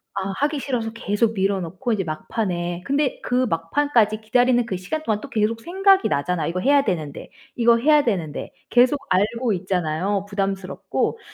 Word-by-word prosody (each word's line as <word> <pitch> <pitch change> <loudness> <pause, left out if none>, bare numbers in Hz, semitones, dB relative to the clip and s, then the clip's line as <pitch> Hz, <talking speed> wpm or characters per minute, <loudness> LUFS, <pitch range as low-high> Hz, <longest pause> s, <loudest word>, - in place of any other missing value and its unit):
아 195 0 -2
하기 290 0 0
싫어서 240 -5 -2
계속 225 0 0
미뤄 195 0 +1
놓고 185 +8 -4
인제 195 -3 0
막판에 175 +1 -3
근데 280 -1 0
그 250 +1 +1
막판까지 215 - +1
기다리는 245 +2 +2
그 200 - -3
시간 310 +13 -4
동안 215 -4 -1
또 - - -9
계속 225 +1 0
생각이 385 - +3
나잖아요. 165 +4 -1
'이거 185 +2 -2
해야 280 +5 +4
되는데. 155 - -4 0.3
이거 235 -1 +4
해야 295 +4 +4
되는데.' 175 -10 -3 0.2
계속 255 +4 +4
알고 215 +5 +1
있잖아요, 185 +1 -1
부담스럽고. 195 - -2
215 Hz, 370 characters per minute, -22 LUFS, 185-250 Hz, 0.3 s, 해야